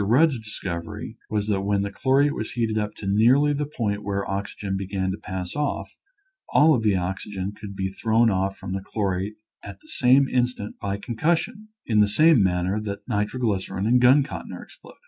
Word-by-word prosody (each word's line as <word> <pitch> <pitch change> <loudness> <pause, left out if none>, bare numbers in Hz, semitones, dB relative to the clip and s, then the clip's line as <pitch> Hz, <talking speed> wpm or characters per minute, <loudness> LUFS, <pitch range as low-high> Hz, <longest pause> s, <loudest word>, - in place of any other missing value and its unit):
Eudd's 130 +6 +3
discovery 90 -6 -6
was 105 -1 -1
that 100 -2 +1
when 100 0 0
the 100 - -3
chlorate 140 +6 +2
was 110 - -5
heated 115 -2 -1
up 105 -1 0
nearly 120 +9 +4
to 145 - -3
the 150 - -1
point 105 -8 -2
where 100 -1 -2
the - - -5
oxygen 100 0 -4
began 95 -1 -2
to 95 - -4
pass 95 -3 -5
oil, 150 -1 -1 0.6
all 155 +1 +5
of 125 - +1
the 105 -3 +2
oxygen 95 +1 -3
could 105 -1 -9
be 95 0 -1
thrown 110 +4 +2
off 95 +1 -1
from 95 -1 -6
the 95 - -3
chlorate 100 0 -2 0.3
at 100 -1 -10
the - - -21
same 130 +2 +4
instant 125 -5 -1
by 100 0 -2
concussion 170 - -1
— - - -64
in 110 -2 +2
the 105 - +5
same 155 +5 +5
manner 95 +2 +1
that 100 -1 -6
nitroglycerin 105 -2 -1
and 125 +2 +4
gun 130 +3 +6
cotton - - -7
are - - -8
exploded. - - -16
105 Hz, 200 wpm, -24 LUFS, 95-125 Hz, 0.6 s, gun